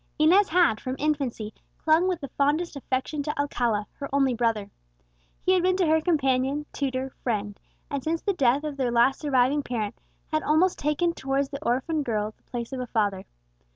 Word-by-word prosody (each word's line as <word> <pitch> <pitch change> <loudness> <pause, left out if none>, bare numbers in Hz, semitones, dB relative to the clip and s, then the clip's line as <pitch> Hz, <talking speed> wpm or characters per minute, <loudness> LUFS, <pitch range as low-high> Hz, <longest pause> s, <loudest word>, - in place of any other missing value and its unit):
Inez 360 +7 +5
had, 335 -11 +3
from 255 0 -3
infancy, 270 -8 -1 0.2
clung 320 +3 +3
with 360 -3 -1
the 280 - -6
fondest 295 +4 0
affection 280 +2 -2
to 295 0 -4
Alcala, 240 -7 0
her 280 - -5
only 270 -2 +3
brother. 225 -4 0 0.7
He 370 - +3
had 370 -1 +4
been 370 +1 +2
to 370 - +2
her 315 0 +3
companion, 280 -3 +1
tutor, 265 -1 -2
friend; 210 -4 -2 0.3
and 280 -2 -4
since 325 +2 -1
the 400 - +1
death 275 -3 +2
of 300 -2 -4
their 260 -3 0
last 240 +3 +3
surviving 280 -1 +2
parent, 225 -6 -3 0.4
had 310 0 +1
almost 320 +5 +2
taken 300 +4 +1
towards 270 -2 -1
the 280 +1 -7
orphan 285 +6 0
girl 215 -5 -2
the - - -38
place 240 +1 -5
of 260 - -3
a 250 - -4
father. 205 -4 0
275 Hz, 190 wpm, -26 LUFS, 245-310 Hz, 0.7 s, Inez